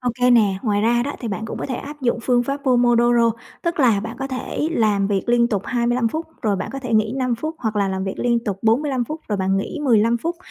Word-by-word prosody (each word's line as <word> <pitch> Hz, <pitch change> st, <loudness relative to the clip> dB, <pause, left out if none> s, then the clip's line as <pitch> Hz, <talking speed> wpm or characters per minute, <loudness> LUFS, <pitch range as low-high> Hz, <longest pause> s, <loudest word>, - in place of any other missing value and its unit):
OK 250 Hz, 0 st, +1 dB
nè, 205 Hz, -5 st, +3 dB
ngoài 205 Hz, -3 st, +1 dB
ra 240 Hz, +2 st, +2 dB
đó, 285 Hz, +3 st, -3 dB
thì 235 Hz, -, -4 dB
bạn 215 Hz, +2 st, -4 dB
cũng -, -, -6 dB
có -, -, -4 dB
thể 260 Hz, -, -3 dB
áp 295 Hz, +3 st, -8 dB
dụng 240 Hz, -1 st, +1 dB
phương 245 Hz, -1 st, +2 dB
pháp 275 Hz, +3 st, -2 dB
Pomodoro, 240 Hz, -2 st, +4 dB, 0.3 s
tức 340 Hz, -2 st, -1 dB
là 230 Hz, -7 st, +4 dB
bạn 225 Hz, +2 st, -6 dB
có 270 Hz, -, -3 dB
thể 265 Hz, +3 st, -3 dB
làm 210 Hz, -6 st, +2 dB
việc 195 Hz, -1 st, 0 dB
liên 235 Hz, 0 st, +3 dB
tục 200 Hz, -4 st, -1 dB
25 240 Hz, -1 st, +1 dB
phút, 320 Hz, +6 st, -4 dB, 0.2 s
rồi 210 Hz, -3 st, +1 dB
bạn -, -, -4 dB
có 275 Hz, -, -4 dB
thể 245 Hz, -3 st, -2 dB
nghỉ 215 Hz, +1 st, +2 dB
5 255 Hz, -2 st, 0 dB
phút, 310 Hz, +7 st, -4 dB
hoặc 220 Hz, -3 st, -2 dB
là 200 Hz, -1 st, +1 dB
làm 190 Hz, 0 st, -2 dB
việc 195 Hz, -, -4 dB
liên 235 Hz, -1 st, +1 dB
tục 195 Hz, -2 st, -3 dB
45 255 Hz, +3 st, +1 dB
phút 310 Hz, +6 st, -6 dB
rồi 210 Hz, -, 0 dB
bạn 190 Hz, 0 st, 0 dB
nghỉ 200 Hz, -, -3 dB
15 230 Hz, -2 st, +3 dB
phút. 335 Hz, +7 st, -3 dB
235 Hz, 265 wpm, -21 LUFS, 215-255 Hz, 0.3 s, Pomodoro